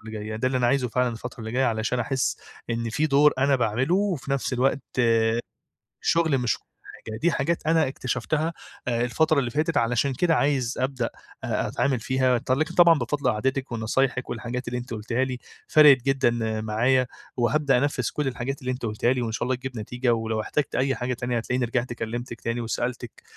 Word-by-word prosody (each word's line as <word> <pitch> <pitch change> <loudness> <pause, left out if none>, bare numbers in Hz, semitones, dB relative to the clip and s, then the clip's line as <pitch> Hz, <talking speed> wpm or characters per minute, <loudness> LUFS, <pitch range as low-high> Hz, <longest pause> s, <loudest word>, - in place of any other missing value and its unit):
اللي 110 0 -10
جاية 110 +1 -5
ده 130 - -1
اللي 130 0 +1
أنا 120 - +2
عايزُه 125 0 +2
فعلًا 125 +2 +1
الفترة 120 +1 -7
اللي 110 0 -6
جاية، 130 +2 +2
علشان 115 +2 0
أحس 130 +2 0 0.3
إن 115 0 -2
في 150 +7 +1
دور 145 0 +5
أنا 140 +1 +3
باعمله 125 +7 +1
وفي 185 -9 -1
نفس 140 -1 -1
الوقت 130 +2 +1 1.2
شغلي 160 -5 +2
مش 120 -4 0
كُلّ - - -38 0.4
حاجة. 110 -1 -5
دي 170 +9 +2
حاجات 165 +2 -1
أنا 160 -3 +3
اكتشفتها 155 +5 -2 0.3
آآ، 120 -1 0
الفترة 155 +5 +2
اللي 125 -3 -1
فاتت 155 +3 0
علشان 125 +4 +1
كده 165 +4 +2
عايز 135 -3 +1
أبدأ 130 -2 -1 0.4
أ - - -1
أتعامل 130 -4 0
فيها 130 0 +2
ط 130 +2 -4
لكن 150 +5 0
طبعًا 170 -4 +6
بفضل 130 +1 0
قعدتِك 130 +4 -2
ونصايحِك 125 +3 0
والحاجات 120 +2 -4
اللي 125 0 -2
أنتِ 120 0 -9
قُلتيها 115 +4 -1
لي، 130 -1 -4 0.3
فرَقِت 145 -4 +7
جدًا 120 -5 +1
معايا 120 +4 +2 0.3
وهابدأ 130 +3 +2
أنفِّذ 140 -4 0
كل 150 -2 -1
الحاجات 130 +2 -3
اللي 130 0 -2
أنت 125 -2 -4
قُلتيها 110 +3 +1
لي، 125 - -2
وإن 115 - -2
شاء 115 - -2
الله 130 - +1
تجيب 130 -1 -7
نتيجة، 125 +3 0
ولو 110 -1 -1
احتجت 145 +6 -2
أي 135 +1 +1
حاجة 125 +1 -2
تانية 120 0 -2
هتلاقيني 125 +2 -1
رِجِعت 120 +1 -2
كلِّمتِك 120 +1 -5
تاني 115 +1 -2
وسألتِك 120 +1 -4
125 Hz, 195 wpm, -25 LUFS, 115-135 Hz, 1.2 s, فرَقِت